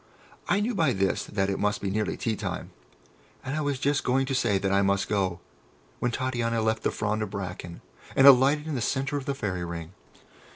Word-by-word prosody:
I 205 - +3
knew 235 +4 0
by 160 - +2
this 95 -1 0
that 95 -2 -1
it 95 - -2
must 105 +1 0
be 100 - -2
nearly 105 +1 -1
tea 110 -2 -1
time, - - -5 0.7
and 135 - -3
I 155 - -1
was 145 -2 -1
just 145 +2 0
going 135 +2 +2
to 135 - -3
say 120 -6 +2
that 95 0 -1
I 100 0 +4
must 100 0 +1
go, 95 -4 -1 0.6
when 125 - +1
Titania 120 -2 -1
left 110 0 0
the - - +1
frond 105 0 -2
of 105 - -2
bracken, 90 -3 -6 0.3
and 135 - +6
alighted 140 +3 +7
in 160 - -3
the 130 - -2
centre 135 +5 -1
of 135 - -5
the 140 - -2
Fairy 95 -9 -3
Ring. 85 0 -6
110 Hz, 215 wpm, -27 LUFS, 100-135 Hz, 0.7 s, alighted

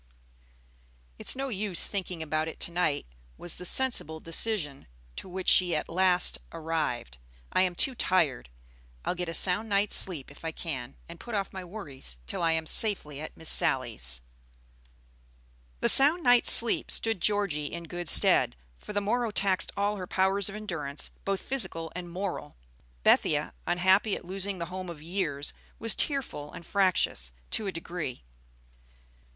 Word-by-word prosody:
"It's - - +2
no 270 +1 -4
use 200 -5 0
thinking 185 -4 -4
about 155 0 -2
it 160 - -8
to - - -2
night," 170 -4 -1 0.3
was 175 - -4
the 180 - -7
sensible 180 - +4
decision 165 -4 -1 0.3
to - - -8
which 185 0 -6
she 180 -2 +3
at - - -3
last 180 +1 +2
arrived. 155 - -4 0.3
"I - - +3
am 180 -1 0
too 265 - 0
tired. 165 - 0 0.6
I'll - - 0
get 180 -1 -4
a - - -4
sound 195 +4 +1
night's 200 +1 +1
sleep 155 -8 +2
if 145 - -17
I 165 - -3
can, 135 -7 -6
and 170 0 -12
put 240 -2 -7
off 200 -1 -3
my 190 -1 -7
worries 150 - -7
till - - -5
I 165 -1 +2
am 160 0 -2
safely 155 -7 +2
at 155 - -9
Miss 160 - +3
Sally's." 60 0 +4 1.6
The - - +2
sound 305 +6 +7
night's 245 -1 +6
sleep 230 -1 +5
stood 225 -5 +1
Georgie 195 -9 -1
in 170 - -7
good 175 -1 -2
stead, - - +7 0.2
for 210 - -10
the 205 - -1
morrow 235 +3 -1
taxed 195 -3 0
all 205 +1 -1
her 185 -2 -7
powers 190 +2 +1
of 200 - -9
endurance, 160 -9 -5
both 195 -1 -2
physical 190 -11 -2
and 180 -1 -7
moral. 185 - -6 0.5
Bethia, - - +2
unhappy 190 +4 +2
at - - -10
losing 195 +1 -3
the 170 - -4
home 185 -1 -6
of 170 -3 -9
years, 160 -5 -3 0.2
was 225 -1 +1
tearful 260 - -2
and 170 - -10
fractious 185 - 0 0.2
to 215 - -1
a - - -2
degree. 165 - -7
180 Hz, 165 wpm, -27 LUFS, 160-200 Hz, 1.6 s, sound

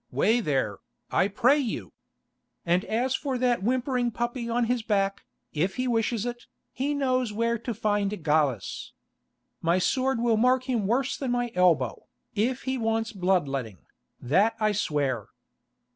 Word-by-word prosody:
Way 225 +3 +2
there, 135 - -1 0.3
I 190 - +3
pray 245 +8 +3
you! 250 -6 -4 0.7
And 175 +2 +2
as 245 +4 0
for 270 -1 -1
that 245 -3 +1
whimpering 250 +2 0
puppy 240 +1 -3
on 240 +1 +1
his 245 +1 0
back, 200 -2 0 0.3
if 180 +6 0
he 255 0 -1
wishes 230 -1 0
it, 240 0 -5 0.2
he 285 +3 -1
knows 255 -4 +1
where 230 +2 0
to 235 - -4
find 205 -3 -1
Gallus. 145 -9 0 0.7
My 170 +2 +2
sword 260 +6 +1
will 230 -2 +2
mark 250 +3 +3
him 240 -6 -1
worse 255 +5 +1
than 270 - -3
my 245 -1 0
elbow, 165 -9 +2 0.3
if 235 +5 0
he 260 -1 -2
wants 225 0 0
blood 185 -5 +1
letting, 125 -8 -4 0.4
that 195 - +2
I 215 -1 +2
swear." 145 - -1
225 Hz, 155 wpm, -27 LUFS, 185-250 Hz, 0.7 s, I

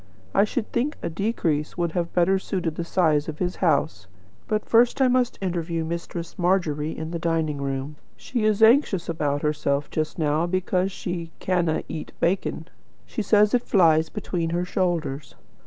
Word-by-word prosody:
I 200 - +5
should 225 +1 -3
think 265 +6 -1
a - - -2
decrease 165 -6 -1
would 170 -2 0
have 170 0 -2
better 185 +2 +3
suited 180 -4 -2
the 170 - -4
size 160 -4 +2
of 155 - -6
his 180 +1 -2
house. 140 - +1 0.4
But 215 -1 -1
first 235 +3 +4
I 265 - +5
must 250 -1 +1
interview 170 -2 -2
Mistress 170 +1 -5
Margery 165 -4 0
in 160 +1 -5
the 170 - -3
dining 160 -3 -1
room. 140 +2 -3 0.2
She 240 -4 -3
is 215 0 +3
anxious 220 - +4
about 145 -3 -1
herself 145 -1 0
just 155 -1 -2
now 155 +1 +1
because 185 +1 0
she 175 -3 -5
'canna 175 -4 0
eat 155 - -6
bacon.' 170 -2 -1 0.4
She - - -4
says 210 0 +4
it 245 - +4
flies 160 -7 +3
between 175 -5 -3
her 175 +2 -1
shoulders. 165 -7 -2
170 Hz, 170 wpm, -24 LUFS, 155-195 Hz, 0.4 s, I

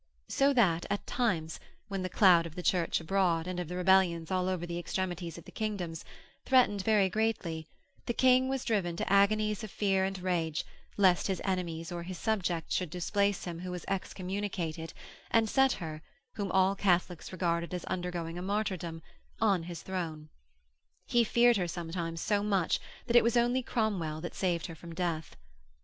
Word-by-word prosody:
So 275 +1 +3
that 180 -10 +3
at 200 0 -2
times, 175 -10 -1 0.3
when 195 -2 -3
the 185 - -2
cloud 175 -4 +5
of 160 - -13
the 180 - -5
Church 175 -3 +2
abroad, 170 -1 +1
and 180 0 -4
of 175 - -3
the 180 - -5
rebellions 180 -3 +3
all 185 0 +1
over 180 -2 -2
the 170 0 -4
extremities 175 -2 -3
of 170 - -11
the - - -12
kingdoms, 190 -7 -3 0.4
threatened 245 -6 +4
very 210 -3 +4
greatly, 185 -6 -1 0.4
the 240 - 0
King 255 0 +4
was 270 -1 -2
driven 195 -7 0
to 190 - -1
agonies 210 +1 +3
of 215 - -5
fear 195 -1 +1
and 195 0 -1
rage 170 -4 -1 0.3
lest 185 -4 +4
his 190 -2 -1
enemies 175 -3 -2
or 175 -1 -4
his 180 +1 -6
subjects 180 -7 -1
should 180 -3 -1
displace 200 +4 0
him 170 -2 -5
who 180 +1 -6
was 180 -1 -5
excommunicated 185 -4 -3 0.4
and 225 -1 +3
set 270 +3 +4
her, 155 -4 -6 0.3
whom 200 -2 -3
all 190 +1 +3
Catholics 180 -3 0
regarded 170 -2 -1
as 180 -1 -4
undergoing 175 -2 -3
a - - -5
martyrdom, 185 -5 -2 0.4
on 200 -5 +3
his 170 0 -7
throne. 160 -5 -4 0.8
He 240 -1 +3
feared 235 +1 +4
her 180 -2 0
sometimes 165 -1 -4
so 205 -1 +1
much 195 -4 +1 0.3
that 240 - -1
it 240 - +8
was 235 +1 +2
only 240 +2 +3
Cromwell 200 -11 -1
that 175 - -5
saved 175 -4 -1
her 165 - -6
from 170 +1 -10
death. 165 -3 -2
185 Hz, 180 wpm, -31 LUFS, 170-205 Hz, 0.8 s, it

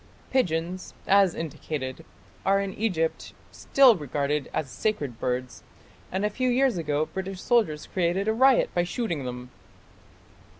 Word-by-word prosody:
Pigeons, 180 -6 -1
as 195 -3 +4
indicated, 150 -2 -5 0.4
are 195 +1 +3
in 195 -1 -3
Egypt 175 -7 -1 0.2
still 265 -4 +5
regarded 145 -2 -2
as 150 - -2
sacred 145 - -2
birds, 125 -1 -3 0.5
and 190 +3 -1
a - - +2
few 255 +4 0
years 255 -1 +3
ago 155 -3 0
British 190 +1 -6
soldiers 195 -11 +1
created 185 +2 0
a 220 - +3
riot 260 +3 +4
by 175 - +2
shooting 175 - -3
them. 125 0 -6
175 Hz, 135 wpm, -26 LUFS, 150-210 Hz, 0.5 s, still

